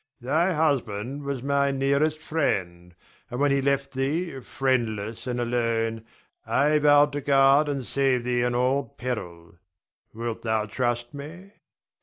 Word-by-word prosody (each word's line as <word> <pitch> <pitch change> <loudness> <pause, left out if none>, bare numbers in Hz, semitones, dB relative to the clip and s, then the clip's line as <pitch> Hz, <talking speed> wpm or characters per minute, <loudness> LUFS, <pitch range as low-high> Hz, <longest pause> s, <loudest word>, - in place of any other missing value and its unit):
Thy 155 +9 +1
husband 140 -4 -1
was 140 -3 -3
my 140 0 +2
nearest 140 +3 +1
friend; 90 - -2 0.3
and, 125 - -5
when 145 0 +3
he 140 0 +2
left 140 0 0
thee 140 +3 -2
friendless 115 -4 -2
and 125 -1 -2
alone, 115 -2 -1 0.4
I 150 +2 +2
vowed 145 0 +5
to 145 +1 -3
guard 140 +2 +4
and 140 -3 -3
save 135 -2 +1
thee 120 0 0
in 120 0 0
all 130 +3 +2
peril. 90 -9 -6 0.5
Wilt 115 0 -5
thou 110 -2 0
trust 120 +2 -2
me? 165 +7 -9
135 Hz, 140 wpm, -25 LUFS, 115-140 Hz, 0.5 s, vowed